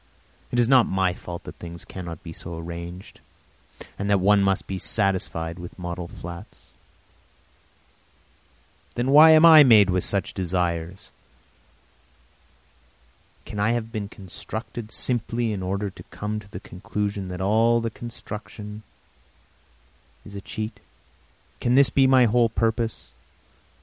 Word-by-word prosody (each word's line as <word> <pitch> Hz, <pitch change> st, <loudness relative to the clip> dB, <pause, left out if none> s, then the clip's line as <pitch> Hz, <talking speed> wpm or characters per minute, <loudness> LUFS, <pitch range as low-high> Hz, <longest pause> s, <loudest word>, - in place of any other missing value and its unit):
It 120 Hz, -, -2 dB
is 120 Hz, -1 st, +4 dB
not 130 Hz, -2 st, +5 dB
my 95 Hz, -1 st, +1 dB
fault 85 Hz, -1 st, -8 dB
that -, -, -10 dB
things 85 Hz, 0 st, -9 dB
cannot 85 Hz, -4 st, -8 dB
be 80 Hz, -, -8 dB
so 85 Hz, 0 st, -8 dB
arranged, 85 Hz, +2 st, -8 dB, 0.8 s
and 100 Hz, +1 st, -2 dB
that 100 Hz, -, +4 dB
one 100 Hz, +2 st, +4 dB
must 100 Hz, 0 st, +1 dB
be 95 Hz, -1 st, -5 dB
satisfied 90 Hz, -5 st, -1 dB
with 90 Hz, 0 st, -10 dB
model 90 Hz, -1 st, -5 dB
flats. 90 Hz, +5 st, -11 dB, 2.2 s
Then 125 Hz, +3 st, 0 dB
why 155 Hz, +3 st, +9 dB
am 160 Hz, +1 st, +7 dB
I 160 Hz, -2 st, +10 dB
made 105 Hz, -7 st, +6 dB
with 90 Hz, 0 st, +1 dB
such 100 Hz, -1 st, -1 dB
desires? 90 Hz, -1 st, -3 dB, 2.3 s
Can 105 Hz, -2 st, -7 dB
I 110 Hz, +3 st, +2 dB
have 115 Hz, -1 st, -3 dB
been 105 Hz, -3 st, -4 dB
constructed 110 Hz, +3 st, -8 dB
simply 120 Hz, -1 st, -1 dB
in 100 Hz, -, -4 dB
order 100 Hz, +2 st, -2 dB
to -, -, -13 dB
come 105 Hz, +1 st, -4 dB
to 100 Hz, -2 st, -14 dB
the 90 Hz, -, -8 dB
conclusion 100 Hz, +1 st, -4 dB
that 90 Hz, -1 st, -6 dB
all 110 Hz, +4 st, +3 dB
my 115 Hz, 0 st, -2 dB
construction 105 Hz, -2 st, -9 dB, 1.4 s
is 100 Hz, -, -11 dB
a 100 Hz, -, -7 dB
cheat? 110 Hz, +2 st, -6 dB, 0.8 s
Can 120 Hz, +1 st, +1 dB
this 140 Hz, 0 st, +6 dB
be 135 Hz, -1 st, +4 dB
my 130 Hz, -1 st, +6 dB
whole 115 Hz, +1 st, +3 dB
purpose? 115 Hz, 0 st, -2 dB
100 Hz, 135 wpm, -24 LUFS, 90-115 Hz, 2.3 s, I